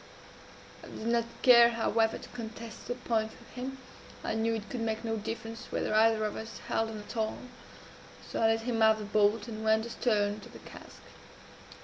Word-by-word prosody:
I - - -10
did 220 - -8
not 235 0 +2 0.2
care, 235 -2 +8
however, 225 -1 +1
to - - -11
contest 225 -1 -8
the 245 - -2
point 225 -3 -1
with - - -17
him. 260 +2 -5 0.5
I - - -1
knew 225 +1 +1
it 220 -1 -5
could 250 - -5
make 225 0 -2
no 225 0 0
diference 225 +1 -6
whether - - -1
either 220 0 +4
of 210 - -3
us 220 0 -7
held 225 0 0
on 220 - -6
at 210 +3 -9
all; 220 -1 -1 0.9
so - - -3
I 225 - +5
let 225 0 +2
him 230 -1 -1
have 220 0 +6
the 215 - -6
bolt, 210 +1 +2
and 220 -1 -6
went 220 0 +3
astern 210 -3 0
to - - -12
the - - -11
cask. - - -13
225 Hz, 200 wpm, -30 LUFS, 220-230 Hz, 0.9 s, care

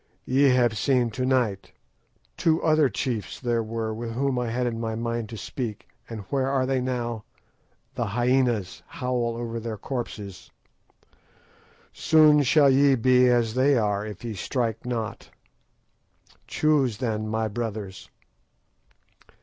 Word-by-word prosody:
Ye 135 +2 +4
have 120 -3 +3
seen 125 -3 +2
to 130 +3 -2
night. 120 -7 0 0.6
Two 160 0 +2
other 155 -3 +4
chiefs 115 -9 -3
there 120 -2 0
were 110 0 -3
with 115 +1 -5
whom 130 +1 0
I 120 -1 -2
had 125 +2 -1
it 120 - -1
in 115 - -5
my 110 -1 -3
mind 115 -1 -3
to 115 - -7
speak, 115 -3 -5 0.2
and 115 -2 -6
where 135 -2 +1
are 135 -1 +1
they 130 -1 0
now? 120 -3 -3 0.7
The - - -2
hyænas 120 -3 0
howl 120 -2 -2
over 115 -1 -4
their 115 -1 -5
corpses. 105 -5 -6 1.4
Soon 155 -2 +5
shall 140 +1 +5
ye 135 +1 +5
be 125 +1 +4
as 120 -2 +2
they 130 +2 +3
are 105 -2 0
if 105 -1 -8
ye 115 - -3
strike 115 +3 -3
not. 115 -1 -4 1.2
Choose 140 -8 +1
then, 110 -3 -2
my 110 0 -1
brothers." 105 -3 -5
120 Hz, 140 wpm, -25 LUFS, 110-130 Hz, 1.4 s, Soon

